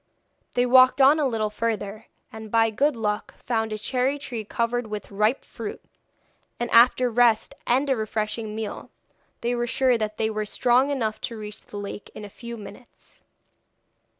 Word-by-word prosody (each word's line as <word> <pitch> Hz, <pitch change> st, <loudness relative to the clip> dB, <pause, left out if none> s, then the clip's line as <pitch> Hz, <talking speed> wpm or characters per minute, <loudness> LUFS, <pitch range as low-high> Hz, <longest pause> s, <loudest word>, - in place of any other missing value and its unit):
They 245 Hz, -, +2 dB
walked 255 Hz, +1 st, +6 dB
on 280 Hz, +3 st, +6 dB
a 290 Hz, -, +2 dB
little 220 Hz, -4 st, -1 dB
further, 215 Hz, -1 st, -3 dB, 0.3 s
and 220 Hz, -1 st, -8 dB
by 225 Hz, 0 st, +3 dB
good 280 Hz, +6 st, +1 dB
luck 210 Hz, -2 st, -3 dB
found 225 Hz, -2 st, 0 dB
a 215 Hz, -, -2 dB
cherry 260 Hz, +5 st, 0 dB
tree 245 Hz, -6 st, -6 dB
covered 235 Hz, +2 st, -1 dB
with 210 Hz, -2 st, -6 dB
ripe 215 Hz, +6 st, +1 dB
fruit, -, -, -7 dB, 0.8 s
and 240 Hz, -, -2 dB
after 250 Hz, +2 st, +6 dB
a -, -, +2 dB
rest 230 Hz, -1 st, +3 dB
and 260 Hz, +4 st, +2 dB
a 270 Hz, -, +2 dB
refreshing 215 Hz, 0 st, -3 dB
meal, 220 Hz, -1 st, -5 dB, 0.5 s
they 240 Hz, +1 st, 0 dB
were 240 Hz, 0 st, -1 dB
sure 255 Hz, -1 st, +2 dB
that 215 Hz, 0 st, -3 dB
they 220 Hz, 0 st, 0 dB
were 215 Hz, -1 st, -3 dB
strong 250 Hz, +5 st, +3 dB
enough 225 Hz, -6 st, -2 dB
to 230 Hz, -, -4 dB
reach 210 Hz, 0 st, -9 dB
the 205 Hz, -, -8 dB
lake 205 Hz, 0 st, -7 dB
in 215 Hz, -, -7 dB
a -, -, -9 dB
few 235 Hz, +3 st, -8 dB
minutes. 210 Hz, +3 st, -14 dB
225 Hz, 180 wpm, -25 LUFS, 215-250 Hz, 0.8 s, walked